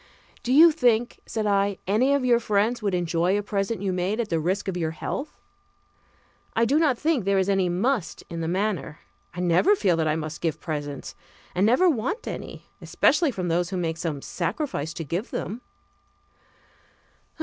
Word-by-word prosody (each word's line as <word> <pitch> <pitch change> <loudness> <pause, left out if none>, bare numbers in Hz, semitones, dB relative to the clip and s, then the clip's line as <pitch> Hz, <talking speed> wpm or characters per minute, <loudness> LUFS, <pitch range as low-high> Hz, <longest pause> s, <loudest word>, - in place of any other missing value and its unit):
"Do 245 - -3
you 320 +5 +8
think," 240 -6 +1
said 220 -1 -2
I, 200 -1 +1
"any 250 +8 +3
of 275 -2 0
your 240 -2 +4
friends 225 +1 +1
would 200 -3 0
enjoy 175 +2 +1
a 205 - -2
present 200 +1 -2
you 190 -2 0
made 185 +5 -1
at 230 -3 -1
the 165 - +1
risk 185 +6 -1
of 190 - -2
your 165 -3 -1
health? 275 - -5 1.2
I 230 - +3
do 285 +6 +3
not 290 -7 +2
think 300 -5 +1
there 200 +1 +2
is 190 0 +2
any 195 -2 +2
'must' 205 +3 -1
in 170 -1 -5
the 160 - -2
matter. 180 -3 -2 0.3
I 180 - -3
never 180 - +4
feel 190 - +2
that 160 -1 +1
I 155 - +1
must 155 0 -5
give 165 -3 -1
presents, 145 -4 -5 0.4
and 190 +4 +2
never 255 +11 +4
want 335 - -1
any, - - -7 0.2
especially 310 +1 +2
from 185 -8 -3
those 175 +1 0
who 190 - -3
make 165 -2 -2
some 155 -5 -4
sacrifice 175 - -3
to 165 - -4
give 175 - -3
them." 225 +6 -4
195 Hz, 185 wpm, -25 LUFS, 170-240 Hz, 1.2 s, you